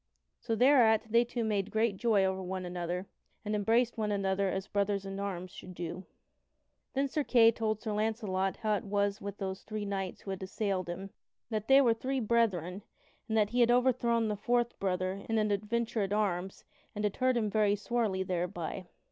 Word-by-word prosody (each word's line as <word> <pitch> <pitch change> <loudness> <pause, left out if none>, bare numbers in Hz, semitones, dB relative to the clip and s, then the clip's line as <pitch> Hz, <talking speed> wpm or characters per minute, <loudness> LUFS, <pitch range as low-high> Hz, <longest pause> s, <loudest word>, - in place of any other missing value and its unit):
So 230 -2 -2
thereat 225 -4 +4
they 235 +1 +5
two 240 0 -3
made 205 -3 0
great 220 -1 +1
joy 210 -3 +3
over 190 0 -1
one 185 0 -4
another, 175 +1 -3 0.4
and 210 - -2
embraced 225 +3 +2
one 210 -1 0
another 195 -1 0
as 190 0 -2
brothers 200 -1 -1
in 195 0 -5
arms 185 -3 -4
should 180 0 -10
do. 175 +2 -6 0.9
Then 275 +1 +2
Sir 295 +2 -1
Kay 230 -4 +6
told 220 -2 -1
Sir 215 - -2
Launcelot 210 -3 -1
how 215 -1 +2
it - - -7
was 200 0 0
with 200 0 -6
those 190 -1 -4
three 215 -1 -5
knights 195 -2 -4
who 195 - -6
had 190 - -5
assailed 190 -1 -2
him; 190 +3 -6 0.4
that 215 -1 -2
they 270 +1 +7
were 240 -4 +4
three 260 +4 -2
brethren, 205 -6 +1 0.5
and 220 - 0
that 210 -1 +2
he 245 - 0
had 240 -1 +5
overthrown 240 -2 +3
the 210 - -1
fourth 240 +3 0
brother 185 0 -1
in 225 - +1
an 215 -1 +1
adventure 220 +2 -1
at 195 0 -1
arms 195 -3 -1 0.3
and 210 - -3
had 205 - -1
hurt 255 -1 +2
him 215 -3 0
very 210 -1 +3
sorely 210 -3 -1
thereby. 180 0 -3
205 Hz, 195 wpm, -31 LUFS, 190-230 Hz, 0.9 s, they